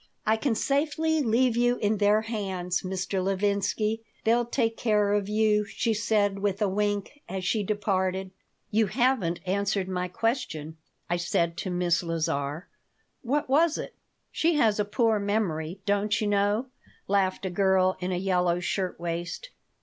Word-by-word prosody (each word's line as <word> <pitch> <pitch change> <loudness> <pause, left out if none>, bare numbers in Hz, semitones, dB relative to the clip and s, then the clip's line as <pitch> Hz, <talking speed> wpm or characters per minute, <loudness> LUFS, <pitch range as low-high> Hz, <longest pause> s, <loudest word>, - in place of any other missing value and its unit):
"I 220 - +4
can 225 +1 0
safely 310 +4 +1
leave 240 0 +2
you 245 +1 +3
in 210 0 +1
their 205 +1 +4
hands, 190 -5 -2
Mr. 190 0 -2
Levinsky. 200 +3 0 0.2
They'll 235 +1 +2
take 230 -2 0
care 210 -3 +2
of 205 -1 0
you," 210 0 +3
she 225 +3 -1
said, 205 -2 +1
with 195 -1 -1
a 210 - +2
wink, 205 +7 -2
as 190 0 -4
she 210 +3 +1
departed 190 -2 -1 0.4
"You 220 0 +3
haven't 235 -8 +1
answered 200 0 0
my 180 -1 -2
question," 175 - -2 0.3
I 175 - 0
said 170 -1 0
to 190 - -3
Miss 175 -1 +1
Lazar 160 -2 -2 0.5
"What 290 +5 -1
was 305 +4 +3
it?" - - -6 0.4
"She 330 0 +1
has 220 -7 +3
a 210 - +2
poor 220 0 +2
memory, 195 -4 -2
don't 205 +1 +1
you 215 - -1
know," 205 +4 +1 0.4
laughed 195 -1 +1
a 190 - -2
girl 190 0 +3
in 185 0 -2
a 180 - 0
yellow 180 -2 +1
shirt 180 0 -2
waist. 170 - -4
205 Hz, 155 wpm, -27 LUFS, 185-225 Hz, 0.5 s, I